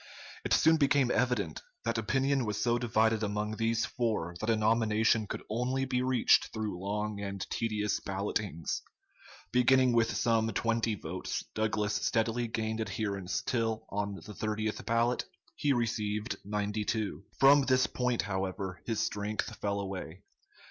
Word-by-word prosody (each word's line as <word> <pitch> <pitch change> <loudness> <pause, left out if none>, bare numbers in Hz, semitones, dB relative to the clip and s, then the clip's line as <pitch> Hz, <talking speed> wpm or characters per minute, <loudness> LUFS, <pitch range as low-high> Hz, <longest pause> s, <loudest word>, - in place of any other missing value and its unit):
It - - -4
soon 160 0 +5
became 140 -3 +3
evident 125 0 0 0.2
that - - 0
opinion 135 +4 +1
was 105 -2 -2
so 120 0 +2
divided 110 -2 +2
among 105 +1 -2
these 115 0 +1
four 110 -9 -1
that 110 - -2
a 115 - +4
nomination 110 0 +2
could - - -5
only 125 +4 0
be 125 -1 0
reached 130 -2 +4
through 110 -5 -3
long 105 +2 -2
and 100 -1 -4
tedious 105 -2 0
ballotings. 100 -3 -2 0.7
Beginning 125 +1 +4
with 115 -1 +2
some 115 -1 +2
20 115 +1 0
votes, 90 -1 -4
Douglas 105 -1 0
steadily 115 +3 0
gained 110 0 -2
adherents 100 -3 -2
till 115 -2 -1
on 100 0 -2
the 90 - -10
30th 110 0 -2
ballot 115 +2 +2 0.3
he 145 - +1
received 110 -2 -1
92. 105 +1 -2 0.2
From 140 +2 +7
this 130 -1 +3
point, 125 -2 0
however, 95 -1 -3
his 115 -2 -1
strength 105 +1 -2
fell 100 -1 -1
away. 95 -2 -6
110 Hz, 140 wpm, -31 LUFS, 105-120 Hz, 0.7 s, From